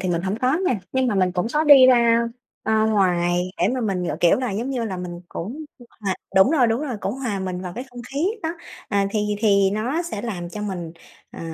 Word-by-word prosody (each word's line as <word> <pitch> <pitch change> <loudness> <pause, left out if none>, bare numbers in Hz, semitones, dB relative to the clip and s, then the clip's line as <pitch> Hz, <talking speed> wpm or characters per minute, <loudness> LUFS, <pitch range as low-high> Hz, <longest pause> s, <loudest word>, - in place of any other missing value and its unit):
thì 185 - -2
mình 170 -1 0
hổng 195 +3 -2
có 255 +4 +2
nha. 220 -7 0
Nhưng 260 0 +1
mà 235 - 0
mình 185 -2 +2
cũng 180 +3 -1
có 305 +1 +2
đi 275 -3 +9
ra, 235 -2 +5 0.4
a, 220 0 +2
ngoài 180 -4 +1
để 175 - +2
mà 255 - -2
mình 195 -5 -1
gọi, 150 - -2
kiểu 170 - +5
là, 250 -2 -2
giống 230 +7 -3
như 250 -3 -2
là 195 -4 -4
mình 175 -1 -6
cũng 255 - -6 0.4
hòa 195 -3 -1 0.2
đúng 190 +7 +6
rồi, 285 -6 +4
đúng 225 +2 0
rồi, 270 -7 -3
cũng 200 - -2
hòa 245 -7 -3
mình 185 -1 -4
vào 180 -1 -6
cái 250 - -5
không 245 0 -9
khí 295 +5 +1 0.2
đó. 320 - -1 0.4
À, 200 -1 +1
thì 210 -1 -1
thì 200 -3 +3
nó 245 - -1
sẽ 220 -12 -5
làm 180 -7 -4
cho 210 +4 -6
mình, 175 -5 -5 0.4
ờ, - - -10
210 Hz, 245 wpm, -22 LUFS, 185-250 Hz, 0.4 s, đi